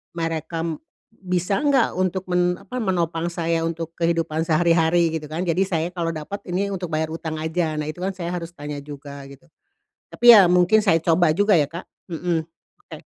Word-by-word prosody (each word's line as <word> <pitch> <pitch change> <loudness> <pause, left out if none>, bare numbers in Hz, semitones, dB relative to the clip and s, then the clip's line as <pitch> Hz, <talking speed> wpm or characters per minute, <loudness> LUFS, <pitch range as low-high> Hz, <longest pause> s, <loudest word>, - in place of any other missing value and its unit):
Merekam 165 -1 -3 0.3
bisa 185 -2 -2
nggak 280 -5 +3
untuk 185 0 0
men 180 0 +2
apa, 250 - -7
menopang 170 -4 -1
saya 165 -1 -1
untuk 165 0 -4
kehidupan 165 -2 0
sehari-hari, 165 +1 +3
gitu 150 - -10
kan. 160 +3 -3
Jadi 175 +2 +1
saya 165 -4 -1
kalau 170 -2 -2
dapet 180 +6 -6
ini 195 +3 -1
untuk 185 -3 -4
bayar 155 0 -1
hutang 160 -1 -5
aja. 160 0 -1
Nah, 150 - -3
itu 155 - -10
kan 190 +1 -2
saya 175 -2 -5
harus 170 -1 -5
tanya 145 -2 -6
juga, 140 -1 -9
gitu. 140 +4 -15 0.7
Tapi 240 - +4
ya 200 -4 +8
mungkin 180 +5 +4
saya 165 -5 +4
coba 165 -1 +3
juga 205 +5 +3
ya, 150 - +3
Kak, 170 +3 -8 0.2
mhm. 165 -1 -2 0.4
Oke. - - -11
170 Hz, 180 wpm, -22 LUFS, 160-180 Hz, 0.7 s, ya